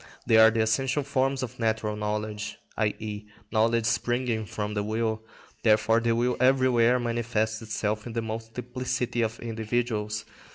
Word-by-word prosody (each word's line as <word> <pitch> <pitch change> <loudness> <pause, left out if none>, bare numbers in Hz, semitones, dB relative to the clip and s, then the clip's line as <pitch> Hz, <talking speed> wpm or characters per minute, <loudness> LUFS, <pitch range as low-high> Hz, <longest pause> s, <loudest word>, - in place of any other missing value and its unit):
They 115 - +5
are 110 0 +9
the 115 0 +1
essential 135 +6 +1
forms 135 0 0
of 120 - -6
natural 110 -2 0
knowledge, 105 0 -3 0.2
i.e., 105 -1 -2 0.2
knowledge 115 +1 +2
springing 120 -1 0
from 105 +3 -3
the 105 - 0
will. 110 +1 -1 0.4
Therefore 110 +1 +4
the 115 0 +1
will 120 +1 +1
everywhere 125 -2 +4
manifests 115 -2 -1
itself 105 0 -2
in 115 - -6
the 115 - -1
multiplicity 120 +2 -3
of 110 0 -1
individuals. 110 -2 -2
115 Hz, 140 wpm, -27 LUFS, 110-120 Hz, 0.4 s, are